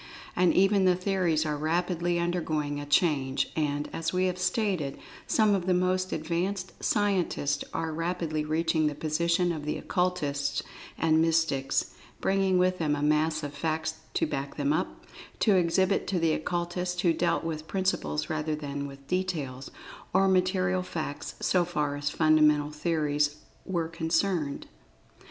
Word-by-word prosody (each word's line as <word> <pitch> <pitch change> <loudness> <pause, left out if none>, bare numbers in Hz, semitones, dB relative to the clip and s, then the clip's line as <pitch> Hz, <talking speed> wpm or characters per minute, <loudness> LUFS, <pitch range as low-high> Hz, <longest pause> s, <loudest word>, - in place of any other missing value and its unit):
And 180 -1 +4
even 195 0 +4
the 180 -1 +5
theories 180 -4 +1
are 150 -1 -1
rapidly 175 +3 0
undergoing 155 -4 -1
a 145 - -6
change, 145 -4 +2
and, 145 -2 -1
as 165 - -2
we 185 0 +1
have 180 -1 -1
stated, 180 -6 0 0.3
some 215 -2 +3
of 185 -2 -1
the 185 - +3
most 185 +1 +1
advanced 180 +4 -2
scientists 185 -9 +1
are 160 -1 -2
rapidly 165 -2 -2
reaching 155 0 +1
the 150 - -2
position 170 +4 +1
of 155 -3 -4
the 150 - -2
Occultists 150 -7 -1 0.3
and 160 -1 +3
mystics, 160 -5 +1 0.3
bringing 195 -1 +2
with 185 0 +2
them 150 -3 +1
a 145 - -3
mass 155 +1 +2
of 145 0 -4
facts 160 0 -2 0.2
to - - +2
back 140 -2 -4
them 145 0 +1
up, 170 +4 -3 0.4
to 210 - +5
exhibit 185 +2 +2
to 190 - 0
the 165 -2 +2
Occultists 175 +2 -2
who 175 -4 +3
dealt 170 +1 0
with 160 -1 -4
principles 185 - -1
rather 155 0 -1
than 145 -1 -4
with 140 0 -12
details, 155 -8 -2 0.5
or 195 0 +5
material 185 0 +2
facts, 155 -5 -5
so 180 -2 +3
far 150 -4 -1
as 145 0 -2
fundamental 150 -1 +3
theories 150 -2 0 0.3
were 170 -4 -1
concerned. 165 -2 -1
165 Hz, 150 wpm, -28 LUFS, 150-180 Hz, 0.5 s, the